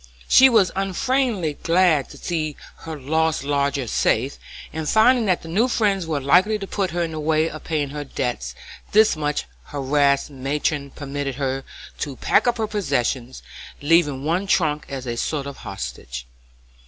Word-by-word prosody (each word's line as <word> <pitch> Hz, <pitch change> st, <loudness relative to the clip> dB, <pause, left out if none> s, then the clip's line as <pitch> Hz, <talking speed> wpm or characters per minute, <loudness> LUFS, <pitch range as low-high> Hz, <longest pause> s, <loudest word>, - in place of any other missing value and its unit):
She 265 Hz, 0 st, +8 dB
was 220 Hz, -6 st, +4 dB
unfeignedly 195 Hz, -, 0 dB
glad 165 Hz, -5 st, +3 dB
to -, -, -12 dB
see 155 Hz, -4 st, -3 dB, 0.2 s
her 160 Hz, -2 st, -7 dB
lost 160 Hz, +2 st, 0 dB
lodger 140 Hz, -1 st, 0 dB
safe, 120 Hz, +4 st, 0 dB, 0.3 s
and 160 Hz, -1 st, -3 dB
finding 230 Hz, +1 st, +4 dB
that 185 Hz, -2 st, +1 dB
the -, -, -9 dB
new 205 Hz, +9 st, +2 dB
friends 200 Hz, -7 st, +1 dB
were 155 Hz, -3 st, -1 dB
likely 180 Hz, +10 st, +4 dB
to 200 Hz, -, -6 dB
put 195 Hz, -1 st, -1 dB
her 175 Hz, +1 st, -1 dB
in 165 Hz, -, -3 dB
the 155 Hz, -, -5 dB
way 155 Hz, +1 st, +2 dB
of 155 Hz, -1 st, -8 dB
paying 150 Hz, -3 st, -1 dB
her 145 Hz, +1 st, -5 dB
debts, 120 Hz, -, -3 dB, 0.4 s
this 215 Hz, -2 st, +5 dB
much 150 Hz, -1 st, -2 dB, 0.2 s
harassed 140 Hz, 0 st, +1 dB
matron 140 Hz, +1 st, -2 dB
permitted 140 Hz, -1 st, -4 dB
her 135 Hz, -1 st, -2 dB, 0.4 s
to 140 Hz, -3 st, -3 dB
pack -, -, +2 dB
up 240 Hz, 0 st, +2 dB
her 220 Hz, -, 0 dB
possessions, 135 Hz, -, -2 dB, 0.4 s
leaving 145 Hz, -3 st, +2 dB
one 175 Hz, +5 st, 0 dB
trunk 150 Hz, -6 st, +1 dB
as 135 Hz, -2 st, -5 dB
a 120 Hz, -1 st, -3 dB
sort 140 Hz, +3 st, -2 dB
of 140 Hz, -1 st, -7 dB
hostage. 65 Hz, -7 st, -7 dB
155 Hz, 165 wpm, -22 LUFS, 140-185 Hz, 0.4 s, She